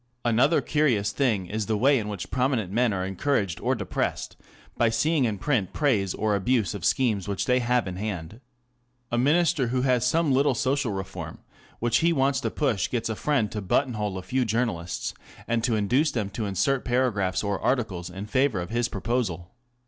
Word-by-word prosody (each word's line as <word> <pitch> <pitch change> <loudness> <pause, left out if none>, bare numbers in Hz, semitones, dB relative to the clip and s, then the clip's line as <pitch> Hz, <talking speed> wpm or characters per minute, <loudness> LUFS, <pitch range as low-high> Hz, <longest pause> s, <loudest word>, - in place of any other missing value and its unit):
Another 125 +7 +3
curious 125 -10 +1
thing 115 -9 0
is 105 +3 -3
the 110 -1 +1
way 135 +4 +4
in 105 - -4
which 100 -4 -6
prominent 125 -7 0
men 120 +2 +2
are 95 -2 -2
encouraged 100 0 -1
or - - +1
depressed - - -3 0.4
by 115 - +3
seeing 140 +5 +2
in 110 -3 -1
print 110 -3 -1
praise 110 - +1
or 110 0 0
abuse 105 +2 +1
of 100 -5 -7
schemes 110 -6 +1
which 100 -1 -2
they 125 0 +3
have 125 -2 +1
in 90 -1 -5
hand. 100 +1 -5 0.7
A 120 - +1
Minister 150 0 +3
who 125 +2 0
has 125 -3 +2
some 155 +4 +2
little 140 +2 +3
social 135 -3 0
reform 95 -1 -6 0.4
which 120 0 +2
he 170 +1 +3
wants 135 -2 +2
to - - -1
push 120 -11 0
gets 115 -2 -2
a 110 - -2
friend 130 -5 0
to 105 - -4
button 125 +7 +1
hole 105 -3 -3
a 95 - -6
few 130 +5 0
journal 115 -5 0
ists, 85 +1 -4 0.3
and 115 -1 0
to 120 - +1
induce 125 +9 +2
them 105 -4 -3
to 110 +1 -3
insert 125 +8 0
paragraphs 120 -8 0
or 100 -2 -1
articles 105 -9 -1
in 95 +3 -7
favour 130 -2 +1
of 90 0 -5
his 120 0 0
proposal. 100 -5 -2
115 Hz, 195 wpm, -26 LUFS, 100-130 Hz, 0.7 s, way